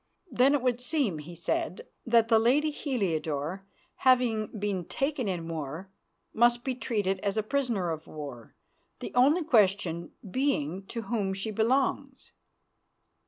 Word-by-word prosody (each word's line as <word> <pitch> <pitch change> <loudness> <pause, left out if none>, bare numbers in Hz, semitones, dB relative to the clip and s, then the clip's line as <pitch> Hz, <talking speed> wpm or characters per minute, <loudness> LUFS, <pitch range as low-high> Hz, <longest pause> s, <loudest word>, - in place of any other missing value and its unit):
"Then 270 +3 +4
it 275 - -1
would 250 -1 +1
seem," 250 - 0
he 165 +4 -9
said, 170 0 -2 0.2
"that 230 -1 +4
the 225 -1 +5
lady 280 +7 +3
Heliodore, 180 - -2 0.3
having 245 -5 +3
been 205 -4 -3
taken 275 - -2
in 175 -4 -3
war, 160 +3 -5 0.4
must 240 +1 +3
be 260 - -1
treated 205 -6 -1
as 200 +2 -2
a 215 - +1
prisoner 230 -8 0
of 160 -1 -6
war, 140 -7 -9 0.4
the - - -7
only 285 +8 +4
question 195 - +2 0.2
being 195 - -1
to 230 -1 -5
whom 200 -3 -1
she 195 +3 -3
belongs." 260 +4 0
215 Hz, 140 wpm, -29 LUFS, 180-255 Hz, 0.4 s, the